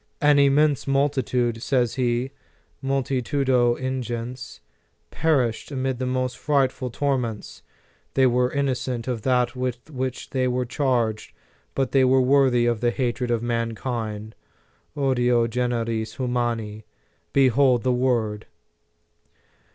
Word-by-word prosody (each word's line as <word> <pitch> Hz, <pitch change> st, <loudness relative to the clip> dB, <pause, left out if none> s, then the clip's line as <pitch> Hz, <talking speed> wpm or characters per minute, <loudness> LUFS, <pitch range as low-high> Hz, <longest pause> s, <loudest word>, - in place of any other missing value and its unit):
"An 145 Hz, -1 st, +4 dB
immense 140 Hz, +1 st, +3 dB
multitude," 130 Hz, -4 st, 0 dB
says 125 Hz, -3 st, +1 dB
he, 125 Hz, 0 st, -1 dB, 0.5 s
"multitudo 130 Hz, -2 st, +1 dB
in 130 Hz, +1 st, -3 dB
gens, 120 Hz, +2 st, -6 dB, 0.5 s
perished 130 Hz, -8 st, 0 dB
amid 130 Hz, -2 st, -2 dB
the 130 Hz, -, -2 dB
most 130 Hz, -1 st, -2 dB
frightful 135 Hz, -3 st, 0 dB
tor 140 Hz, +2 st, 0 dB
ments. 115 Hz, -4 st, -6 dB, 0.5 s
They 135 Hz, -, +4 dB
were 125 Hz, 0 st, +2 dB
innocent 130 Hz, -4 st, -2 dB
of 120 Hz, -3 st, -2 dB
that 125 Hz, 0 st, +1 dB
with 125 Hz, +2 st, -4 dB
which 130 Hz, -2 st, -4 dB
they 130 Hz, -1 st, +1 dB
were 125 Hz, 0 st, 0 dB
charged, 120 Hz, -5 st, -1 dB, 0.4 s
but 135 Hz, -2 st, 0 dB
they 135 Hz, -1 st, +4 dB
were 130 Hz, +1 st, +4 dB
worthy 130 Hz, -2 st, +3 dB
of 120 Hz, -2 st, 0 dB
the 120 Hz, -, +3 dB
hatred 125 Hz, 0 st, -2 dB
of 120 Hz, -1 st, 0 dB
mankind, 115 Hz, -2 st, -3 dB, 0.6 s
odio 125 Hz, -4 st, +2 dB
generis 115 Hz, -2 st, -2 dB
humani" 120 Hz, -4 st, -2 dB, 0.5 s
Behold 130 Hz, -2 st, +3 dB
the 130 Hz, -1 st, +2 dB
word 115 Hz, -4 st, 0 dB
125 Hz, 120 wpm, -24 LUFS, 120-130 Hz, 0.6 s, An